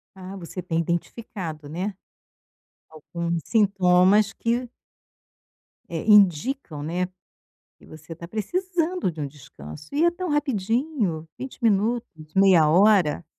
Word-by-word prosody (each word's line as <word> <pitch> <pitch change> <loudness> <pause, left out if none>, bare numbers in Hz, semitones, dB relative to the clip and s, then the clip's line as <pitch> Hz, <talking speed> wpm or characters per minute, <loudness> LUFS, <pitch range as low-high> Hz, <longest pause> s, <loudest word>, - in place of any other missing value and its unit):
Ah, 190 +1 -9
você 180 +1 -7
tem 165 -2 -2
identificado, 170 -2 -4
né, 185 +6 -4 1.0
alguns 170 +2 -4
sintomas 195 -1 +3
que 240 +1 -2 1.2
É, 165 -2 -4
indicam, 205 - +3
né, 180 +3 -2 0.7
que - - -19
você 155 +1 -11
está 170 +1 -10
precisando 350 - -2
de 155 - -11
um 140 - -2
descanso. 135 - -12
E 315 +4 +3
é 345 - +4
tão 360 0 -5
rapidinho, 230 - -1
20 265 0 -8
minutos, 205 -7 -1
meia 185 -6 +5
hora? 180 -4 +4
190 Hz, 115 wpm, -24 LUFS, 165-230 Hz, 1.2 s, meia